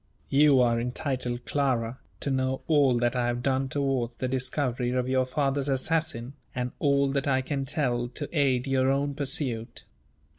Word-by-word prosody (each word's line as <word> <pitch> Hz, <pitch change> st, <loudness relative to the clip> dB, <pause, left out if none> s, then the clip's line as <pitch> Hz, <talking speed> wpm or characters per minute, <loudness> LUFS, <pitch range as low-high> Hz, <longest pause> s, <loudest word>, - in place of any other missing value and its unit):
You 140 Hz, -1 st, +5 dB
are 120 Hz, -1 st, +3 dB
entitled, 125 Hz, -1 st, -3 dB
Clara, 130 Hz, -4 st, 0 dB, 0.2 s
to 140 Hz, -, -1 dB
know 130 Hz, 0 st, -1 dB
all 140 Hz, -6 st, +4 dB
that 120 Hz, +1 st, +1 dB
I 120 Hz, -1 st, +1 dB
have 120 Hz, 0 st, -2 dB
done 135 Hz, 0 st, +1 dB
towards 130 Hz, -4 st, -1 dB
the 130 Hz, -, -2 dB
discovery 130 Hz, -1 st, -1 dB
of 125 Hz, 0 st, 0 dB
your 130 Hz, 0 st, +1 dB
father's 140 Hz, +1 st, 0 dB
assassin, 135 Hz, -3 st, -1 dB, 0.2 s
and 125 Hz, 0 st, -2 dB
all 140 Hz, -1 st, +2 dB
that 140 Hz, +1 st, -1 dB
I 130 Hz, -1 st, +2 dB
can 135 Hz, 0 st, -2 dB
tell 125 Hz, -4 st, -1 dB
to 140 Hz, +4 st, -5 dB
aid 130 Hz, -4 st, +2 dB
your 135 Hz, -1 st, +2 dB
own 140 Hz, +1 st, +1 dB
pursuit. 130 Hz, -5 st, -3 dB
130 Hz, 170 wpm, -27 LUFS, 125-140 Hz, 0.2 s, You